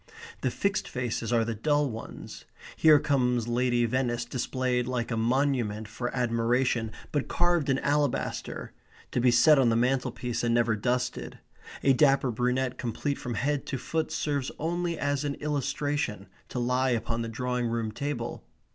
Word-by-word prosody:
The - - +1
fixed 200 -1 -1
faces 120 -2 -3
are 115 -1 +3
the 115 - -2
dull 145 +6 +1
ones. 115 -3 -8 0.3
Here 155 -2 +7
comes 125 -5 +1
Lady 120 0 +2
Venice 120 0 0
displayed 125 0 -1
like 125 -1 -2
a - - 0
monument 115 -3 0
for 120 +3 -4
admiration, 120 -1 +1 0.2
but 145 -2 -1
carved 175 -4 +1
in 135 - +3
alabaster, 145 -1 -1 0.4
to 125 - 0
be 125 - +5
set 130 +5 +6
on 125 -3 +4
the 115 - +2
mantelpiece 125 0 0
and 120 0 +2
never 115 -2 +3
dusted. 125 +3 -2 0.5
A 135 - +5
dapper 135 -1 +4
brunette 125 +2 0
complete 125 +4 -2
from 120 -2 -4
head 140 +6 -1
to 135 - -2
foot 160 +5 -2
serves 145 -4 -1
only 170 +1 -1
as 145 0 0
an 145 -1 -2
illustration 145 -6 -2 0.2
to - - -6
lie 125 +2 +1
upon 115 -1 -1
the 115 - -3
drawing 125 +1 -1
room 115 -1 -2
table. 140 +6 -4
125 Hz, 160 wpm, -28 LUFS, 120-140 Hz, 0.5 s, Here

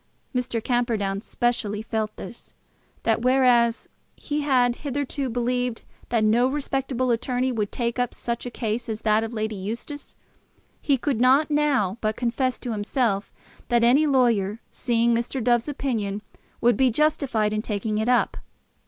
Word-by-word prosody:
Mr. 240 -3 -1
Camperdown 225 -6 0
specially 220 -3 -1
felt 220 -1 -2
this, 235 - -9 0.5
that 225 0 +2
whereas 250 -2 +3 0.3
he 295 0 -3
had 250 -4 +2
hitherto 280 -1 -3
believed 245 0 -1 0.3
that 230 -2 +2
no 230 +4 +4
respectable 270 -2 -1
attorney 250 +2 0
would 215 -4 -2
take 235 0 -2
up 245 -1 0
such 235 0 -4
a 245 - -4
case 230 0 -3
as 220 0 -3
that 215 0 +3
of 225 - -4
Lady 220 -1 -2
Eustace, 230 +9 -6 0.7
he 280 -2 +2
could 255 -2 -1
not 275 +5 +4
now 270 -9 +1
but 215 0 0
confess 250 +2 0
to 245 - -5
himself 210 -1 -1 0.4
that 235 -1 +3
any 270 +6 +5
lawyer 230 -7 +2
seeing 235 -1 +1
Mr. 235 +3 -1
Dove's 240 +1 +2
opinion 220 -8 -2 0.4
would 240 0 +4
be 260 -1 +4
justified 245 -6 +1
in 215 - 0
taking 215 0 -2
it 220 +3 0
up. 250 - +2
240 Hz, 155 wpm, -24 LUFS, 220-255 Hz, 0.7 s, any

